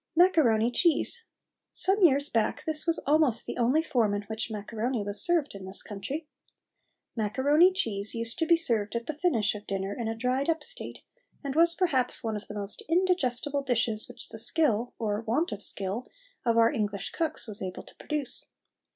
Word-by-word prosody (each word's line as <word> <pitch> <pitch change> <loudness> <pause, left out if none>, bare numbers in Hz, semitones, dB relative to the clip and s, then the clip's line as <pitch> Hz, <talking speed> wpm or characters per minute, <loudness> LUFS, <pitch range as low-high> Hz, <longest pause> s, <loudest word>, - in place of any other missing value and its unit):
MACARONI 265 - +4
CHEESE. 345 - +2 0.5
Some 390 +2 +3
years 285 -3 +4
back 225 -2 -1
this 310 0 0
was 330 - +5
almost 290 -5 +3
the - - -5
only 255 +7 +2
form 235 -10 +1
in 205 - -3
which 220 +3 -4
macaroni 220 +2 -3
was 205 0 +1
served 335 -4 +3
in 195 -1 -9
this 190 - -4
country. 270 +10 -6 0.9
Macaroni 280 - +3
cheese 215 - -1
used 230 +5 -3
to 325 - 0
be 335 0 +5
served 230 -10 +1
at 235 0 -2
the 310 - -3
finish 290 - +1
of 210 0 -10
dinner 195 +1 -3
in 235 - -4
a 225 - -2
dried 255 +5 -1
up 325 -1 0
state, - - -2 0.4
and 280 -1 -3
was 335 +1 +4
perhaps 270 -10 0
one 220 -1 -2
of 210 - -7
the 210 - -8
most 200 0 -1
indigestible 290 -6 +1
dishes 230 -4 -1
which - - -9
the 220 - -8
skill, 240 -2 +1
or 210 -2 -2
want 240 +9 -1
of 210 -1 -5
skill, 205 +5 -1 0.4
of 230 0 +3
our 230 0 +5
English 210 -6 -3
cooks 320 -6 -3
was 215 -2 -1
able 185 -1 -5
to - - -16
produce. 295 -5 -1
240 Hz, 185 wpm, -28 LUFS, 215-315 Hz, 0.9 s, was